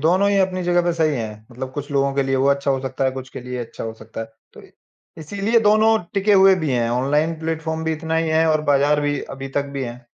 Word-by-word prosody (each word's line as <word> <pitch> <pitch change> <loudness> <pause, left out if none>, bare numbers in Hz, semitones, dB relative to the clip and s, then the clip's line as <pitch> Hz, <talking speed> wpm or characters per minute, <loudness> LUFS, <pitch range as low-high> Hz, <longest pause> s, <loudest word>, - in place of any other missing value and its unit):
दोनों 185 +6 +3
ही 200 - +2
अपनी 185 -1 0
जगह 175 0 +2
पे 175 0 +1
सही 160 -3 +1
हैं। 110 -2 -6
मतलब 130 +2 -7
कुछ 145 +1 -6
लोगों 140 -1 +1
के 140 - +2
लिए 135 0 0
वो 135 +1 +2
अच्छा 140 0 +1
हो 135 -1 0
सकता 135 0 -3
है, 130 - +2
कुछ 130 0 -7
के - - -8
लिए 125 +1 -7
ये 120 - -3
अच्छा - - -9
हो 110 - -4
सकता 110 0 -9
है। 115 0 -8 0.2
तो - - -13
अ, - - -17 0.5
इसीलिए 200 +8 0
दोनों 215 +1 +4 0.2
टिके 200 +1 +2
हुए 195 -1 +7
भी 150 - 0
हैं। 120 -2 +1
ऑनलाइन 150 +6 0
प्लेटफ़ॉर्म 160 0 -3
भी 160 - 0
इतना 160 +1 -3
ही 165 0 0
है 160 +1 +3
और 155 -1 +2
बाज़ार 145 +1 +3
भी 145 -1 -1
अभी 135 0 -7
तक 140 - +2
भी 135 - -2
हैं। 120 0 -8
145 Hz, 270 wpm, -21 LUFS, 130-165 Hz, 0.5 s, हुए